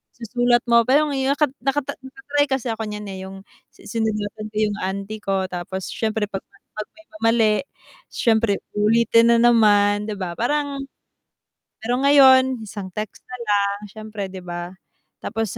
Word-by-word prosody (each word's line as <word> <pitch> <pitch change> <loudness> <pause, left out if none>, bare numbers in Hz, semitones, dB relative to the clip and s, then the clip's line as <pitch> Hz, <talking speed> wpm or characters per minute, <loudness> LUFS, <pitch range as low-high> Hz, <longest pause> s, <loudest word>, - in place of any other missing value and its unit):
susulat 240 +1 +1
mo. 235 0 +5
Pero 290 +4 +4
ngayo 270 -1 0
nak 300 - +1 0.2
nak 275 +1 +1 0.2
naka-try 290 +1 -1
kasi 265 -2 -1
ako 225 0 -4
nyan, 210 0 -6
eh 190 - -7
yung 195 0 -10 0.3
sinulatan 215 -1 -3
ko - - -25
yung 210 -2 0
auntie 200 +3 -4
ko. 195 -1 0
Tapos 180 +1 -5
siyempre 220 -1 -1
'pag 195 - -4
'pag 215 0 -10
may 325 0 -19 0.2
mali, 225 -1 +4 0.6
siyempre 220 -3 +2 0.2
ulitin 230 +2 +4
na - - +4
naman, 205 -2 +4
'di - - -4
ba 175 -2 -4
parang? 285 +3 -1 1.0
Pero 240 +2 0
ngayon? 260 -3 +6
Isang 200 -3 -7
text 215 -1 -6
na 250 - -5
lang 200 -1 +1
siyempre 215 -1 -6
'di 185 -1 -9
ba? 175 0 -5 0.5
Tapos 225 -3 -3
220 Hz, 155 wpm, -22 LUFS, 205-245 Hz, 1.0 s, ngayon